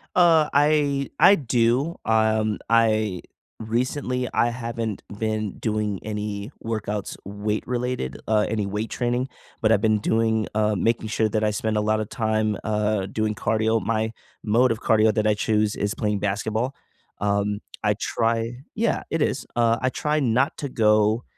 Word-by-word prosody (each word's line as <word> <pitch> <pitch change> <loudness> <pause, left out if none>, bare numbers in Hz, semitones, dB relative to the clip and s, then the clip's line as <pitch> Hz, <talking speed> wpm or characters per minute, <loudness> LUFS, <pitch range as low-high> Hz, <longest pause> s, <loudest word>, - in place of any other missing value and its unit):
Uh, 165 -4 +5
I 145 -1 +2
I 200 - +7
do. 125 +4 +1
Um, 110 -1 +2
I 110 -5 +2 0.4
recently, 125 +3 -1
I 120 - +3
haven't 115 -3 -4 0.2
been 110 -2 -1
doing 105 -3 -1
any 105 0 -4
workouts 105 -2 -3
weight-related, 105 - -3
uh, 105 -1 +3
any 105 -2 -1
weight 105 +3 -3
training, 125 +1 -1 0.3
but 110 - +2
I've 105 - +3
been 110 -1 +2
doing 110 0 +1
uh, 105 0 +2
making 110 +3 0
sure 110 0 +1
that 110 0 0
I 105 - +2
spend 110 +1 -1
a 105 - +2
lot 110 +1 +1
of 110 - -4
time, 110 -2 0
uh, 105 -2 0
doing 110 +1 -1
cardio. 110 +1 +1
My 110 0 -1 0.3
mode 120 +4 +3
of 115 - -5
cardio 110 -1 +3
that 110 0 +1
I 105 - +4
choose 105 0 0
is 100 +1 -1
playing 105 -2 -1
basketball. 110 +6 -1 0.5
Um, 100 0 0 0.2
I 105 0 +3
try 115 +1 -1 0.2
Yeah. 230 +1 0
It 165 - 0
is. 140 - -1
Uh, 115 -1 +3
I 130 - +1
try 150 +3 0
not 130 +1 +1
to 140 - -3
go 110 0 +2
110 Hz, 160 wpm, -24 LUFS, 105-120 Hz, 0.5 s, I